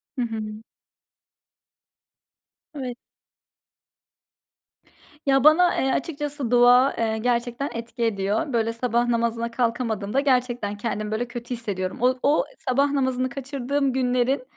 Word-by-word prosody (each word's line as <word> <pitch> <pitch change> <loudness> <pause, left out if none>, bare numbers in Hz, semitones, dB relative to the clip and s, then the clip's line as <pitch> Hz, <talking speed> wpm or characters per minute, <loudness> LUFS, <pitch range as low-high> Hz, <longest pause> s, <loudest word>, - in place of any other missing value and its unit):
Hı 255 - -2
hı. 225 -2 -2 2.3
Eve 255 -4 -5 2.3
Ya, 270 -1 +3
bana, 340 +4 +6
eee, 265 - +1
açıkçası 290 -4 -3
dua, 245 +2 +6
eee, 220 -1 -1
gerçekten 240 +3 -1
etki 235 +1 -5
ediyor. 210 +5 -1
Böyle, 230 -1 +1
sabah 240 0 0
namazına 235 0 0
kalkamadığımda, 230 -1 -1
gerçekten 245 -6 0
kendimi 215 -1 -3
böyle 240 +3 -1
kötü 240 +1 -6
hissediyorum. 190 -5 -4
O 255 +1 +2
o 290 +2 +3 0.2
sabah 275 +3 +2
namazını 260 -2 0
kaçırdığım 275 0 -2
günlerin, 255 +1 +1
245 Hz, 110 wpm, -24 LUFS, 230-270 Hz, 2.3 s, bana